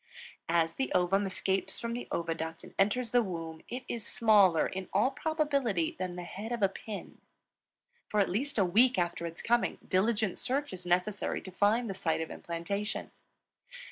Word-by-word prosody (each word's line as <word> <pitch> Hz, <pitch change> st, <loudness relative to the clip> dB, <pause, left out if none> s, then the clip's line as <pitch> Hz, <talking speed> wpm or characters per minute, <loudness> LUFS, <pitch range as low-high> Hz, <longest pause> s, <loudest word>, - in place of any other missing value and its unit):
As 165 Hz, -1 st, +2 dB
the 265 Hz, -, -2 dB
ovum 190 Hz, +3 st, +2 dB
escapes 190 Hz, 0 st, 0 dB
from 235 Hz, 0 st, -3 dB
the 245 Hz, -, -5 dB
oviduct 165 Hz, -1 st, -3 dB
and -, -, -12 dB
enters 225 Hz, +4 st, +2 dB
the 245 Hz, -, +5 dB
womb, 165 Hz, -5 st, -5 dB
it 250 Hz, +1 st, -4 dB
is 235 Hz, -2 st, -4 dB
smaller, 205 Hz, -7 st, +4 dB
in 190 Hz, 0 st, -5 dB
all 210 Hz, +8 st, +3 dB
probability, 280 Hz, -, 0 dB
than 185 Hz, -1 st, -3 dB
the 180 Hz, -, -5 dB
head 205 Hz, +6 st, -6 dB
of 235 Hz, -3 st, -1 dB
a 195 Hz, -, +5 dB
pin. 205 Hz, +1 st, -8 dB, 0.9 s
For 210 Hz, -, +1 dB
at 200 Hz, -, +4 dB
least 250 Hz, +10 st, -1 dB
a 195 Hz, -, +4 dB
week 235 Hz, +7 st, +4 dB
after 170 Hz, -1 st, -1 dB
its 165 Hz, 0 st, -7 dB
coming, 240 Hz, 0 st, +2 dB
diligent 210 Hz, +1 st, +1 dB
search 275 Hz, -1 st, -1 dB
is 180 Hz, -1 st, -7 dB
necessary 180 Hz, +4 st, 0 dB
to 190 Hz, -, -8 dB
find 210 Hz, +6 st, +2 dB
the 195 Hz, -, -3 dB
site 165 Hz, -4 st, 0 dB
of 160 Hz, -, -4 dB
implantation. 185 Hz, +5 st, -4 dB
195 Hz, 175 wpm, -31 LUFS, 175-235 Hz, 0.9 s, the